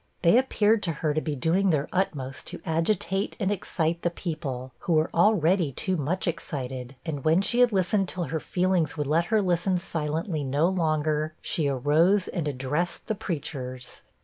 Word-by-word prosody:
They 180 +8 +6
appeared 225 -4 +2
to 170 -4 -1
her 150 0 -1
to 155 - 0
be 150 -2 -3
doing 175 +8 +2
their 150 -4 +1
utmost 135 -8 -2
to - - -6
agitate 180 +4 0
and 195 -2 +1
excite 170 -4 -1
the 175 - +1
people, 150 -7 -5
who 175 - -1
were 155 +1 +2
already 175 -3 +3
too 185 +8 -1
much 170 +5 -1
excited; 130 -5 -4
and 145 -5 -4
when 165 +5 +3
she 240 +4 +1
had 245 -1 +5
listened 190 0 +1
till 180 - -3
her 160 +1 -2
feelings 180 -3 0
would 150 - -1
let 160 +4 +2
her 215 +2 +2
listen 180 +1 +1
silently 160 -1 -2
no 140 +5 +2
longer, 155 -3 0
she 155 -4 -1
arose 155 +9 +3
and 165 -4 -3
addressed 145 +6 -2
the 220 - -1
preachers. 135 - -5
165 Hz, 175 wpm, -26 LUFS, 150-185 Hz, -, They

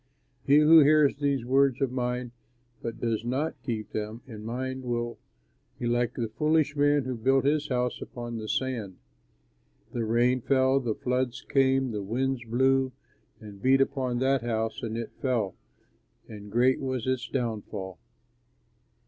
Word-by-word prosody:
"He 140 +1 +6
who 155 +2 +8
hears 150 -1 +5
these 140 -4 0
words 135 0 +3
of 135 -3 0
mine 125 -1 -2 0.5
but 115 -1 -5
does 115 -2 -1
not 130 +4 -2
keep 115 -4 -4
them 110 +2 -5
in 110 -4 -9
mind 130 +3 -4
will 120 -1 -3 0.6
be - - -4
like 120 0 0
a 115 -2 -1
foolish 150 +5 +1
man 145 0 +3
who 130 0 -3
built 135 +4 +2
his 150 +1 +1
house 125 -2 -1
upon 120 -1 -6
sand. 115 -7 -2 1.0
The 120 - -1
rain 120 +3 +2
fell, 130 +1 +3
the 115 -5 -2
floods 125 0 -2
came, 135 -1 +2
the 105 -2 -3
winds 125 +5 -1
blew 130 +2 +2 0.5
and 105 -3 -12
beat 135 +3 +4
upon 130 -2 0
that 135 +1 +2
house, 115 -1 -2
and 115 -1 -4
it 115 -1 -5
fell, 115 -8 0 0.7
and 105 -1 -10
great 125 +3 +3
was 130 -3 -3
its 130 -2 -1
downfall." 105 -7 -4
125 Hz, 150 wpm, -27 LUFS, 115-135 Hz, 1.0 s, who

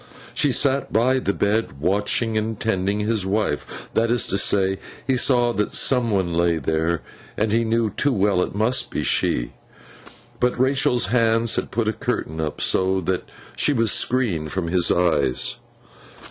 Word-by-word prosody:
She 145 - +1
sat 140 +1 +1
by 125 +4 +2
the 100 - -1
bed, 100 -8 -1
watching 105 - 0
and 110 0 -2
tending 100 -1 -1
his 110 -1 0
wife. 95 -6 -1 0.3
That 115 +1 +1
is 120 0 +2
to 100 - +1
say, 95 -1 +1 0.3
he 135 - +1
saw 120 -1 +2
that 105 -2 -1
some 125 -3 +2
one 95 -5 0
lay 85 0 +2
there, 80 +1 -1 0.3
and 110 0 0
he 115 +2 +2
knew 115 -1 0
too 140 +8 +1
well 100 -5 +1
it 90 - -3
must 110 +5 +1
be - - -3
she; - - 0 0.9
but 125 0 +1
Rachael's 130 -5 +2
hands 115 -1 +2
had - - -2
put 115 +1 -1
a 110 - +1
curtain 80 -5 -3
up, 75 -1 -4
so 95 0 +1
that 90 +1 -3 0.3
she 145 - +2
was 115 -5 +2
screened 100 -12 0
from 90 -3 -2
his 90 0 +2
eyes. 75 -7 +1
105 Hz, 170 wpm, -22 LUFS, 90-115 Hz, 0.9 s, by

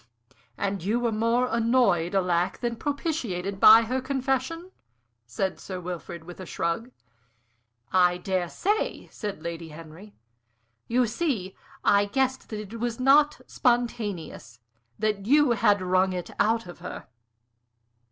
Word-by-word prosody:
"And 195 -3 -2
were 230 +4 0
more 230 +3 +1
annoyed, 225 -7 +2
alack! 180 -2 +1
than 240 -1 -1
propitiated 230 - -3
by 220 +3 +9
her 255 +3 -2
confession?" 270 +6 -2 0.6
said 185 +12 -2
Sir 185 -2 -6
Wilfrid, 175 -1 -7
with 175 +2 -11
a 185 - -7
shrug. 170 +11 -2 1.0
"I 180 -1 +4
dare 180 -1 -2
say," 415 - -1
said 205 -7 -6
Lady 165 -1 -5
Henry. 165 +6 -12 0.7
"You 245 +1 +2
see, 220 - -2 0.3
I 200 0 +4
guessed 260 +5 -1
that 215 - -5
it 230 - -6
was 235 0 -2
not 290 +3 +4
spontaneous; 210 - -2 0.4
that 210 -2 -1
you 290 0 +5
had 205 -3 +3
wrung 185 +1 +2
it 180 -1 -5
out 225 +1 +2
of 175 -1 -11
her." 180 - -7
210 Hz, 130 wpm, -26 LUFS, 180-245 Hz, 1.0 s, by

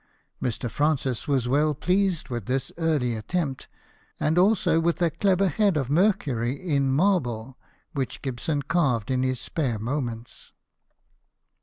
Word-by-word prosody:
Mr. 120 0 -2
Francis 135 -1 0
was 135 -4 +1
well 150 +3 +2
pleased 185 +2 0
with 120 -5 -4
this 130 +1 -1
early 150 -8 +1
attempt, 135 +5 -3 0.5
and 155 - +1
also 190 -4 +3
with 170 +1 0
a 170 -2 +2
clever 195 +3 +2
head 195 +1 +2
of 135 -2 -2
Mercury 145 - +1
in 140 -6 +1
marble, 135 - 0 0.3
which 135 -3 -3
Gibson 140 +3 -2
carved 135 - +1
in 130 -1 +1
his 130 -1 0
spare 130 -9 -2
moments. 120 0 -5
140 Hz, 135 wpm, -25 LUFS, 125-170 Hz, 0.5 s, also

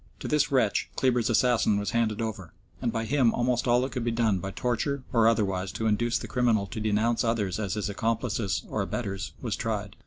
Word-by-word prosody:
To - - -5
this 150 0 +2
wretch 125 -6 +2
Kleber's 125 -3 +2
assassin 115 -3 +3
was 105 0 -2
handed 115 -2 0
over, 95 -7 -5 0.3
and 120 -2 0
by 115 0 -2
him 120 -1 +2
almost 120 +1 0
all 120 +1 +4
that 130 - -2
could 125 -3 -3
be 120 - 0
done 115 -4 +1
by 95 - -4
torture 125 +6 -2
or 115 -2 +5
otherwise 95 -4 +1
to 110 +2 -3
induce 115 +2 +1
the - - -6
criminal 120 -5 +2
to 110 +4 -6
denounce 110 +2 +1
others 110 -5 0
as 100 -2 -2
his 105 -3 -2
accomplices 110 -3 -1
or 110 - -2
abettors 100 -1 -4
was - - -1
tried. - - -3
115 Hz, 210 wpm, -27 LUFS, 105-120 Hz, 0.3 s, or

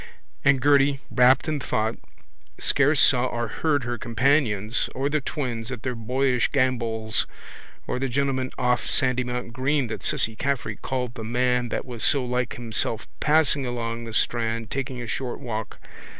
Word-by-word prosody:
And 140 -1 +4
Gerty, 140 -1 +4
rapt 125 +2 +5
in 155 -2 -1
thought, 110 -3 -1 0.6
scarce 145 +1 +3
saw 130 -2 +5
or 120 -1 -2
heard 145 -1 0
her 120 -1 -3
companions 115 -3 +1
or 135 +2 0
the 155 -1 +1
twins 125 -5 -4
at 125 -4 -6
their 125 - -1
boyish 125 +2 +1
gambols 115 -5 0 0.6
or - - -2
the 135 0 -1
gentleman 130 0 0
off 125 -1 +1
Sandymount 125 -2 0
green 135 +2 +1
that - - -5
Cissy 110 - +1
Caffrey 125 -5 -2
called 125 -2 -3
the 115 - -7
man 125 +1 +1
that - - -3
was 120 -3 -6
so 135 -3 +3
like 125 -1 -1
himself 115 -1 -2
passing 150 -2 +3
along 115 -1 -3
the 115 - -7
strand 115 -1 -1
taking 135 -2 -3
a 120 - -5
short 125 +2 -4
walk. 110 -5 -5
125 Hz, 160 wpm, -25 LUFS, 115-135 Hz, 0.6 s, rapt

